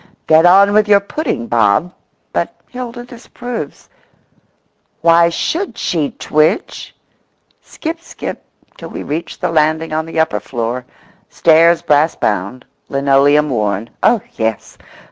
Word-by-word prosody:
"Get 160 Hz, +2 st, +5 dB
on 200 Hz, +3 st, +6 dB
with 215 Hz, 0 st, +3 dB
your 205 Hz, -1 st, +6 dB
pudding, 200 Hz, -, -3 dB
Bob;" 115 Hz, -, +1 dB, 0.4 s
but -, -, -2 dB
Hilda 245 Hz, -1 st, -7 dB
disapproves. 245 Hz, -, -8 dB, 1.1 s
"Why 170 Hz, +1 st, +5 dB
should 340 Hz, -, -3 dB
she 155 Hz, -5 st, -1 dB
twitch?" 155 Hz, -, -1 dB, 0.7 s
Skip, 330 Hz, +1 st, -6 dB
skip, -, -, -7 dB, 0.4 s
till -, -, -8 dB
we -, -, -6 dB
reach 155 Hz, +4 st, -5 dB
the -, -, -2 dB
landing 155 Hz, 0 st, +1 dB
on 155 Hz, +1 st, -2 dB
the 165 Hz, -, -3 dB
upper 160 Hz, -10 st, +1 dB
floor; 120 Hz, +3 st, -4 dB, 0.4 s
stairs 165 Hz, +1 st, +4 dB
brass 150 Hz, 0 st, +2 dB
bound; 105 Hz, +5 st, -2 dB, 0.2 s
linoleum 140 Hz, +2 st, +3 dB
worn; 105 Hz, -1 st, -2 dB
oh, 235 Hz, -4 st, +3 dB, 0.2 s
yes! 110 Hz, -2 st, -3 dB
160 Hz, 125 wpm, -16 LUFS, 135-200 Hz, 1.1 s, on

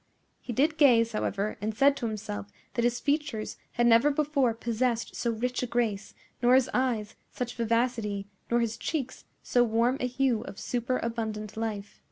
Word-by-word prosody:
He -, -, -7 dB
did 300 Hz, +7 st, +1 dB
gaze, 230 Hz, -6 st, +5 dB
however, 210 Hz, -1 st, -2 dB
and 215 Hz, +1 st, -2 dB
said 280 Hz, +2 st, +5 dB
to 235 Hz, -, -2 dB
himself 150 Hz, -, -5 dB, 0.3 s
that 235 Hz, -, 0 dB
his 240 Hz, 0 st, +1 dB
features 285 Hz, -7 st, -1 dB, 0.2 s
had 240 Hz, -, +2 dB
never 235 Hz, +4 st, +6 dB
before 280 Hz, -5 st, +1 dB
possessed 235 Hz, 0 st, -1 dB
so 235 Hz, -, -1 dB
rich 245 Hz, +2 st, -1 dB
a 250 Hz, -, -2 dB
grace, 225 Hz, -4 st, -1 dB, 0.3 s
nor 245 Hz, +1 st, +6 dB
his 260 Hz, -1 st, +3 dB
eyes 235 Hz, -5 st, 0 dB, 0.2 s
such 245 Hz, -1 st, -4 dB
vivacity, 230 Hz, -3 st, 0 dB, 0.2 s
nor 240 Hz, 0 st, +3 dB
his 230 Hz, -1 st, -1 dB
cheeks 275 Hz, -6 st, -4 dB, 0.2 s
so 245 Hz, -, +3 dB
warm 235 Hz, +3 st, +2 dB
a 250 Hz, -, 0 dB
hue 250 Hz, -2 st, +1 dB
of -, -, -9 dB
superabundant 230 Hz, -4 st, -2 dB
life. 215 Hz, -2 st, -4 dB
235 Hz, 170 wpm, -28 LUFS, 220-255 Hz, 0.3 s, never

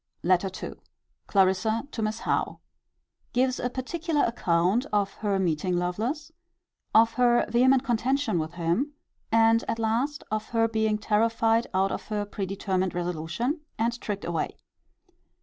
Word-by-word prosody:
LETTER 185 Hz, +2 st, +3 dB, 0.2 s
II. -, -, -6 dB, 0.5 s
Clarissa 200 Hz, +5 st, +2 dB
to 225 Hz, -, -4 dB
Miss 215 Hz, +1 st, -2 dB
Howe. -, -, -1 dB, 0.7 s
Gives 255 Hz, +1 st, +1 dB
a 250 Hz, -, -1 dB
particular 300 Hz, +4 st, -1 dB
account 190 Hz, -, +1 dB
of 200 Hz, -1 st, +1 dB
her 205 Hz, -2 st, 0 dB
meeting 180 Hz, 0 st, 0 dB
Lovelace; 225 Hz, -, -2 dB, 0.6 s
of 225 Hz, +1 st, +6 dB
her 240 Hz, -1 st, +4 dB
vehement 255 Hz, +3 st, +4 dB
contention 255 Hz, -3 st, +1 dB
with 160 Hz, +1 st, -4 dB
him; 175 Hz, -, -1 dB, 0.4 s
and, 225 Hz, +1 st, +4 dB
at -, -, -1 dB
last, 235 Hz, +6 st, -1 dB
of 215 Hz, 0 st, -2 dB
her 225 Hz, -1 st, +2 dB
being 220 Hz, -1 st, +1 dB
terrified 225 Hz, +2 st, +2 dB
out 190 Hz, +1 st, +1 dB
of -, -, -5 dB
her 210 Hz, -1 st, -2 dB
predetermined 190 Hz, -2 st, -2 dB
resolution, 175 Hz, -, -2 dB, 0.2 s
and 235 Hz, +2 st, -1 dB
tricked 205 Hz, -1 st, -4 dB
away. 170 Hz, -2 st, -2 dB
220 Hz, 135 wpm, -27 LUFS, 190-240 Hz, 0.7 s, of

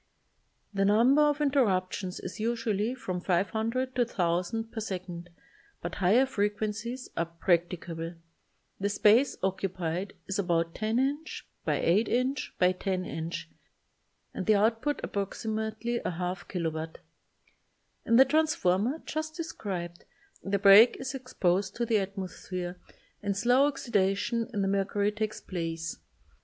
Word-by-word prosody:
The 195 Hz, 0 st, +1 dB
number 235 Hz, +8 st, +5 dB
of 295 Hz, 0 st, +3 dB
interruptions 195 Hz, -10 st, +1 dB
is 185 Hz, +5 st, -7 dB
usually 230 Hz, 0 st, 0 dB
from 185 Hz, -7 st, -4 dB
500 220 Hz, +8 st, 0 dB
to 250 Hz, -, +1 dB
1,000 195 Hz, +1 st, -1 dB
per 225 Hz, -, -5 dB
second 180 Hz, -4 st, -5 dB, 0.5 s
but 175 Hz, -, -5 dB
higher 215 Hz, +9 st, +5 dB
frequencies 215 Hz, +2 st, -2 dB
are 170 Hz, -, 0 dB
practicable. 170 Hz, -1 st, -1 dB, 0.6 s
The 200 Hz, +1 st, 0 dB
space 215 Hz, +6 st, +4 dB
occupied 185 Hz, -1 st, -2 dB
is 195 Hz, +1 st, -3 dB
about 170 Hz, -3 st, +1 dB
10" 255 Hz, +7 st, 0 dB
x -, -, -8 dB, 0.2 s
8" 205 Hz, +7 st, +2 dB
x 255 Hz, +4 st, 0 dB, 0.3 s
10" 185 Hz, -2 st, -1 dB, 1.3 s
and -, -, -4 dB
the 215 Hz, -, +6 dB
output 225 Hz, +8 st, +1 dB
approximate 220 Hz, +2 st, -3 dB
ly 240 Hz, 0 st, 0 dB
y2 180 Hz, +1 st, -3 dB
k.w. 160 Hz, -3 st, -2 dB, 1.2 s
In 230 Hz, -, +2 dB
the 265 Hz, +3 st, +8 dB
transformer 270 Hz, -, +1 dB
just 310 Hz, 0 st, -4 dB
described 190 Hz, -, -5 dB, 0.4 s
the 200 Hz, +1 st, 0 dB
break 200 Hz, +4 st, +8 dB
is 265 Hz, 0 st, -4 dB
exposed 195 Hz, -7 st, 0 dB
to 235 Hz, -, -1 dB
the 225 Hz, -2 st, +2 dB
atmosphere 185 Hz, -2 st, -5 dB, 0.4 s
and 200 Hz, -1 st, -1 dB
a -, -, -5 dB
slow 245 Hz, +6 st, +4 dB
oxidation 230 Hz, -3 st, 0 dB
of 205 Hz, -3 st, -1 dB
the -, -, +1 dB
mercury 200 Hz, +1 st, +1 dB
takes 215 Hz, 0 st, -3 dB
place. 165 Hz, -2 st, -4 dB
205 Hz, 125 wpm, -29 LUFS, 185-235 Hz, 1.3 s, the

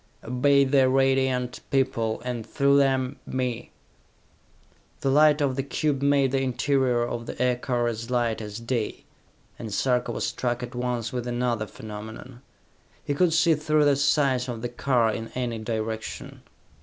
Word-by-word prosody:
"Obey 140 Hz, +4 st, +3 dB
the 135 Hz, -1 st, +3 dB
Radiant 130 Hz, -1 st, +1 dB
People, 130 Hz, -5 st, 0 dB
and 120 Hz, -2 st, -3 dB
through 140 Hz, +5 st, +2 dB
them, 135 Hz, -1 st, +1 dB
me!" 125 Hz, -3 st, -3 dB, 1.3 s
The 135 Hz, -, +1 dB
light 150 Hz, +1 st, +5 dB
of 135 Hz, -2 st, +1 dB
the 135 Hz, -, 0 dB
cube 140 Hz, +1 st, -1 dB
made 140 Hz, -2 st, +3 dB
the 135 Hz, 0 st, +1 dB
interior 130 Hz, -1 st, +1 dB
of 120 Hz, 0 st, -4 dB
the -, -, -7 dB
aircar 125 Hz, -1 st, 0 dB
as 115 Hz, 0 st, -3 dB
light 120 Hz, -3 st, 0 dB
as 105 Hz, 0 st, -6 dB
day, 115 Hz, -1 st, -3 dB, 0.6 s
and 110 Hz, -3 st, -6 dB
Sarka 125 Hz, +3 st, 0 dB
was -, -, -2 dB
struck 120 Hz, -1 st, -2 dB
at 125 Hz, -, -7 dB
once 125 Hz, -1 st, -2 dB
with 125 Hz, -1 st, -3 dB
another 120 Hz, -3 st, -1 dB
phenomenon. 110 Hz, +4 st, -9 dB, 0.6 s
He 145 Hz, -, -1 dB
could 170 Hz, +4 st, +2 dB
see 165 Hz, +1 st, +4 dB
through 155 Hz, 0 st, +2 dB
the 145 Hz, -1 st, +4 dB
sides 135 Hz, -2 st, +2 dB
of 115 Hz, -1 st, -5 dB
the 120 Hz, -, -2 dB
car 120 Hz, -2 st, +1 dB
in 115 Hz, 0 st, -5 dB
any 120 Hz, -3 st, -2 dB
direction. 110 Hz, 0 st, -5 dB
125 Hz, 155 wpm, -25 LUFS, 120-135 Hz, 1.3 s, light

